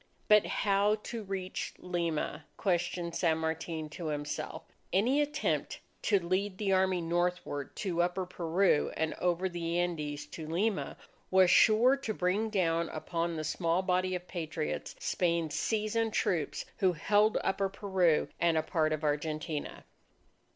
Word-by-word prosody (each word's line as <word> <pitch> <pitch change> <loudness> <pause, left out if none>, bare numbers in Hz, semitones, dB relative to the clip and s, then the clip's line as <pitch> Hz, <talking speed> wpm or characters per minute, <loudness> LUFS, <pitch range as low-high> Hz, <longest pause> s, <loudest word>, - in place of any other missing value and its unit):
But 210 -1 +6
how 200 +1 +2
to 230 -2 -5
reach 190 -2 -4
Lima? 165 -4 -2
questioned 175 -2 -1
San 160 -3 +2
Martin 160 0 -3
to 160 +2 -6
himself. 145 -1 -4 0.3
Any 250 +10 +3
attempt 295 +1 -1 0.2
to 205 - +3
lead 185 +2 -1
the 200 -1 0
army 185 -1 +2
northward 175 -4 -1
to 175 -4 -1
Upper 180 +1 0
Peru, 175 -1 +1
and 160 -1 0
over 180 +1 +1
the 170 -1 -2
Andes 155 -5 -2
to 160 -2 -8
Lima, 190 +6 -1 0.3
was 185 -1 +5
sure 235 +5 +6
to 225 -6 -4
bring 195 +5 +1
down 170 -5 +1
upon 170 +2 -2
the 155 - -3
small 165 +4 0
body 185 0 +1
of 180 0 -6
Patriots, 160 -3 -4
Spain's 170 -3 0
seasoned 220 +2 0
troops 165 -4 0
who 185 -2 +3
held 210 +6 +3
Upper 195 0 0
Peru 190 -5 +2
and 170 -1 +3
a 155 - +2
part 155 -1 +1
of 155 0 -3
Argentina. 150 +1 -2
175 Hz, 145 wpm, -31 LUFS, 160-195 Hz, 0.3 s, But